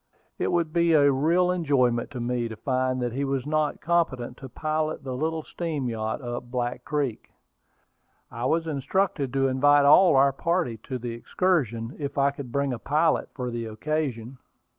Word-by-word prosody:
It -, -, 0 dB
would 165 Hz, -3 st, 0 dB
be 170 Hz, -1 st, +3 dB
a 145 Hz, -2 st, +5 dB
real 170 Hz, +7 st, +2 dB
enjoyment 135 Hz, -9 st, +1 dB
to 135 Hz, -4 st, -7 dB
me 120 Hz, 0 st, -1 dB
to 110 Hz, -, -7 dB
find 130 Hz, +2 st, -1 dB
that 120 Hz, -1 st, -2 dB
he 135 Hz, +3 st, -2 dB
was 135 Hz, -2 st, -1 dB
not 155 Hz, 0 st, 0 dB
competent 150 Hz, -8 st, 0 dB
to 135 Hz, -, -9 dB
pilot 155 Hz, +2 st, -2 dB
the 130 Hz, -1 st, -4 dB
little 160 Hz, +3 st, -2 dB
steam 155 Hz, -7 st, -3 dB
yacht 110 Hz, +3 st, -3 dB
up 120 Hz, 0 st, -5 dB
Black 120 Hz, 0 st, -3 dB
Creek. 140 Hz, -6 st, -2 dB, 1.0 s
I 120 Hz, +1 st, -4 dB
was 165 Hz, +5 st, +1 dB
instructed 150 Hz, -1 st, -1 dB
to 135 Hz, 0 st, +2 dB
invite 145 Hz, +2 st, +4 dB
all 150 Hz, +3 st, +7 dB
our 135 Hz, +1 st, +5 dB
party 170 Hz, -5 st, -1 dB
to 130 Hz, -, -4 dB
the 120 Hz, -1 st, -5 dB
excursion, 120 Hz, -, -1 dB
if 140 Hz, -1 st, -4 dB
I 140 Hz, 0 st, +3 dB
could 140 Hz, -3 st, -8 dB
bring 140 Hz, 0 st, 0 dB
a 120 Hz, -, -5 dB
pilot 155 Hz, +6 st, +1 dB
for 125 Hz, -2 st, -3 dB
the 115 Hz, -1 st, -4 dB
occasion. 130 Hz, 0 st, -3 dB
140 Hz, 180 wpm, -26 LUFS, 125-155 Hz, 1.0 s, all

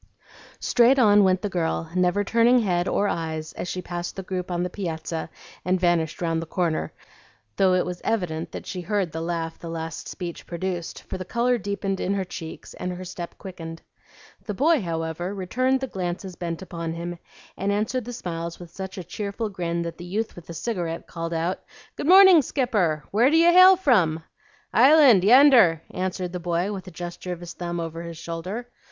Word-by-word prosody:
Straight 245 Hz, +3 st, +4 dB
on 205 Hz, -5 st, +6 dB
went 185 Hz, +1 st, +2 dB
the -, -, +1 dB
girl, 165 Hz, -2 st, -2 dB
never 185 Hz, +2 st, +2 dB
turning 235 Hz, +4 st, +4 dB
head 180 Hz, -6 st, +1 dB
or 205 Hz, -, +1 dB
eyes 160 Hz, -3 st, -3 dB
as -, -, -5 dB
she 180 Hz, 0 st, -4 dB
passed 175 Hz, 0 st, -5 dB
the 190 Hz, -, -5 dB
group 185 Hz, -1 st, -4 dB
on 175 Hz, 0 st, -1 dB
the 180 Hz, -, -2 dB
piazza 165 Hz, -4 st, -4 dB, 0.3 s
and 185 Hz, +1 st, +1 dB
vanished 175 Hz, -2 st, +1 dB
round 165 Hz, -1 st, 0 dB
the 165 Hz, -, -7 dB
corner, 170 Hz, -2 st, -1 dB, 0.7 s
though 185 Hz, -1 st, +4 dB
it 180 Hz, -, +1 dB
was 180 Hz, 0 st, -5 dB
evident 170 Hz, -7 st, -2 dB
that -, -, -7 dB
she 185 Hz, -, -5 dB
heard 190 Hz, -1 st, -1 dB
the 160 Hz, -, -4 dB
laugh 165 Hz, -1 st, -3 dB
the 170 Hz, -, -7 dB
last 165 Hz, -1 st, -5 dB
speech 175 Hz, -3 st, -7 dB
produced, 175 Hz, 0 st, -4 dB
for 185 Hz, -, -6 dB
the -, -, -3 dB
color 240 Hz, +5 st, +1 dB
deepened 200 Hz, -1 st, -3 dB
in 195 Hz, -, 0 dB
her 195 Hz, -, 0 dB
cheeks 165 Hz, -3 st, -8 dB
and 180 Hz, -, -4 dB
her 185 Hz, +1 st, -7 dB
step 175 Hz, -1 st, -7 dB
quickened. 165 Hz, -4 st, -8 dB, 0.6 s
The 210 Hz, -, -3 dB
boy, 305 Hz, -, +3 dB
however, 165 Hz, +2 st, -3 dB
returned 255 Hz, +8 st, 0 dB
the -, -, 0 dB
glances 185 Hz, -3 st, -4 dB
bent 170 Hz, 0 st, -4 dB
upon 170 Hz, -3 st, -5 dB
him, 170 Hz, +1 st, -5 dB, 0.4 s
and 195 Hz, +1 st, -1 dB
answered 215 Hz, +4 st, -1 dB
the 245 Hz, -, -6 dB
smiles 170 Hz, -6 st, -5 dB
with 175 Hz, -2 st, -11 dB
such 190 Hz, +2 st, -7 dB
a 185 Hz, -, -5 dB
cheerful 210 Hz, +4 st, -4 dB
grin 170 Hz, -3 st, -2 dB
that 170 Hz, 0 st, -6 dB
the -, -, -7 dB
youth 210 Hz, +5 st, -3 dB
with 175 Hz, -, -12 dB
the 170 Hz, -, -7 dB
cigarette 170 Hz, -4 st, -3 dB
called 165 Hz, -1 st, -5 dB
out, 170 Hz, +3 st, -1 dB, 0.4 s
"Good -, -, -4 dB
morning, 375 Hz, -2 st, +9 dB
Skipper! 210 Hz, -, 0 dB
Where 230 Hz, +6 st, +4 dB
do 320 Hz, -, +4 dB
you 335 Hz, +1 st, +6 dB
hail 370 Hz, +2 st, +9 dB
from?" 185 Hz, -, +2 dB, 0.5 s
"Island, 265 Hz, -, +7 dB
yender," 235 Hz, -, +7 dB
answered 185 Hz, -1 st, -3 dB
the 180 Hz, -, -3 dB
boy, 175 Hz, +3 st, -1 dB
with 190 Hz, -1 st, -7 dB
a -, -, -8 dB
gesture 175 Hz, +1 st, -6 dB
of 175 Hz, -, -8 dB
his 170 Hz, -1 st, -8 dB
thumb 175 Hz, -1 st, -4 dB
over 165 Hz, 0 st, -5 dB
his 170 Hz, -1 st, -7 dB
shoulder. 170 Hz, +8 st, -5 dB
180 Hz, 195 wpm, -24 LUFS, 170-205 Hz, 0.7 s, morning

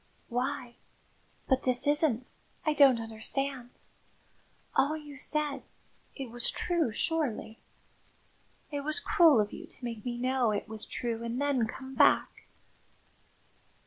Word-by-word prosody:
"Why 250 Hz, 0 st, -3 dB, 0.7 s
but 265 Hz, -1 st, +2 dB
this 250 Hz, -1 st, +4 dB
isn't 290 Hz, -5 st, +2 dB, 0.3 s
I 310 Hz, -, +2 dB
don't 275 Hz, -5 st, +6 dB
understand! 245 Hz, +3 st, -3 dB, 1.1 s
All 300 Hz, +3 st, +2 dB
you 295 Hz, -2 st, -10 dB
said 300 Hz, -1 st, -1 dB, 0.5 s
it 265 Hz, -5 st, -6 dB
was 240 Hz, 0 st, +1 dB
true, 340 Hz, -8 st, 0 dB
surely? 235 Hz, -7 st, -2 dB, 1.1 s
It 290 Hz, -, -2 dB
was 305 Hz, +5 st, 0 dB
cruel 340 Hz, -, +5 dB
of 210 Hz, -1 st, 0 dB
you -, -, -8 dB
to 250 Hz, -, -10 dB
make 230 Hz, -3 st, -5 dB
me 240 Hz, -1 st, -3 dB
know 255 Hz, -1 st, +1 dB
it 205 Hz, -1 st, -2 dB
was 220 Hz, 0 st, -7 dB
true 230 Hz, -2 st, -4 dB
and 235 Hz, +2 st, -3 dB
then 280 Hz, -5 st, +1 dB
come 265 Hz, +3 st, -8 dB
back!" -, -, +3 dB
260 Hz, 130 wpm, -30 LUFS, 235-290 Hz, 1.1 s, don't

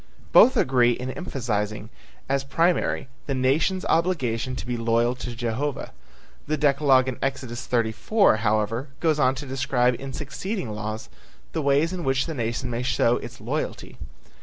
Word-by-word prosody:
Both 255 Hz, -, +7 dB
agree 125 Hz, -2 st, +4 dB
in 125 Hz, +2 st, -5 dB
emphasizing 110 Hz, -, -3 dB, 0.4 s
as 135 Hz, 0 st, 0 dB
primary 165 Hz, +2 st, +1 dB, 0.2 s
the 135 Hz, -, -1 dB
nation's 150 Hz, +9 st, +1 dB
obligation 130 Hz, -8 st, 0 dB
to -, -, -6 dB
be 125 Hz, 0 st, -2 dB
loyal 115 Hz, +1 st, +1 dB
to 120 Hz, -2 st, -6 dB
Jehovah. 120 Hz, +5 st, -3 dB, 0.6 s
The 155 Hz, +1 st, 0 dB
decalogue 140 Hz, -2 st, +4 dB
in 130 Hz, -, -3 dB
Exodus 130 Hz, -3 st, -3 dB
34, 120 Hz, -, +2 dB
however, 110 Hz, +4 st, 0 dB
goes 155 Hz, -3 st, +1 dB
on 130 Hz, -2 st, +3 dB
to 140 Hz, +2 st, -6 dB
describe 130 Hz, -2 st, +1 dB
in 135 Hz, 0 st, -6 dB
succeeding 150 Hz, -, -4 dB
laws 110 Hz, +1 st, -5 dB, 0.4 s
the 160 Hz, -, -2 dB
ways 145 Hz, +5 st, +2 dB
in 180 Hz, -2 st, -4 dB
which 135 Hz, -1 st, +1 dB
the 165 Hz, -, -4 dB
nation 120 Hz, -1 st, -2 dB
may 120 Hz, +1 st, -2 dB
show 120 Hz, -1 st, +2 dB
its -, -, -9 dB
loyalty. -, -, -4 dB
130 Hz, 155 wpm, -25 LUFS, 120-145 Hz, 0.6 s, Both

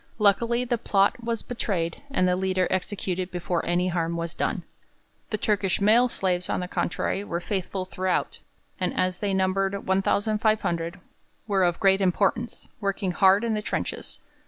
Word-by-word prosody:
Luckily 230 Hz, +4 st, +3 dB
the 240 Hz, -1 st, 0 dB
plot 200 Hz, +4 st, +2 dB
was 230 Hz, -1 st, -2 dB
betrayed 185 Hz, -8 st, -2 dB
and 185 Hz, -10 st, +2 dB
the 180 Hz, -, +3 dB
leader 185 Hz, 0 st, +1 dB
executed 185 Hz, -1 st, -2 dB
before 175 Hz, -1 st, -2 dB
any 180 Hz, +1 st, +2 dB
harm 170 Hz, -1 st, -1 dB
was 170 Hz, +1 st, -3 dB
done. -, -, -1 dB, 0.7 s
The 215 Hz, -, -1 dB
Turkish 200 Hz, -3 st, +1 dB
male 225 Hz, +5 st, +5 dB
slaves, 180 Hz, -4 st, -1 dB
on -, -, 0 dB
the 180 Hz, -, -3 dB
contrary, 190 Hz, +2 st, -1 dB
were 170 Hz, -4 st, -3 dB
faithful 190 Hz, 0 st, -3 dB
throughout, 185 Hz, 0 st, -1 dB, 0.4 s
and 180 Hz, -1 st, -1 dB
as 185 Hz, -1 st, +1 dB
they 205 Hz, -1 st, -1 dB
numbered 195 Hz, +1 st, 0 dB
1,500 195 Hz, -3 st, +1 dB, 0.5 s
were 195 Hz, -3 st, +2 dB
of 175 Hz, -1 st, +1 dB
great 195 Hz, -1 st, +4 dB
importance, 195 Hz, +5 st, 0 dB
working 200 Hz, -2 st, -1 dB
hard 190 Hz, +4 st, +5 dB
in 230 Hz, -1 st, 0 dB
the 210 Hz, -, -1 dB
trenches. -, -, -4 dB
190 Hz, 160 wpm, -26 LUFS, 180-210 Hz, 0.7 s, male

